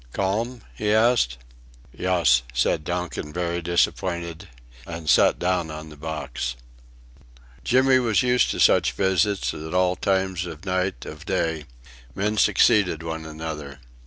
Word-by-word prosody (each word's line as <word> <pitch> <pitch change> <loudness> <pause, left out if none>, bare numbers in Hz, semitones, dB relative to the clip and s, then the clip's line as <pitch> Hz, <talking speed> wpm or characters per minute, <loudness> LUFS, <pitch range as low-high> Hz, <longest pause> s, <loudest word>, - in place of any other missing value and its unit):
"Calm?" 110 +5 -1
he 105 -1 -1
asked. 110 - +3 0.6
"Yuss," 85 -9 +3
said 65 - +1
Donkin, 90 -3 -4
very 85 +1 -2
disappointed, 85 +1 -1 0.4
and 80 -1 -7
sat 75 - +5
down 90 -2 0
on 75 0 -8
the 75 - -12
box. 70 -5 -4 1.1
Jimmy 130 +1 +4
was 115 -2 +2
used 125 0 +3
to - - -3
such - - +4
visits 95 +1 +1
at 80 +3 -6
all 90 0 +2
times 95 -2 -1
of 80 +1 -9
night 95 0 -1
of 75 +1 -9
day. 80 -5 -1 0.5
Men 105 +2 -1
succeeded 90 -5 +3
one 80 -1 -5
another. 75 -3 -7
90 Hz, 130 wpm, -24 LUFS, 80-100 Hz, 1.1 s, sat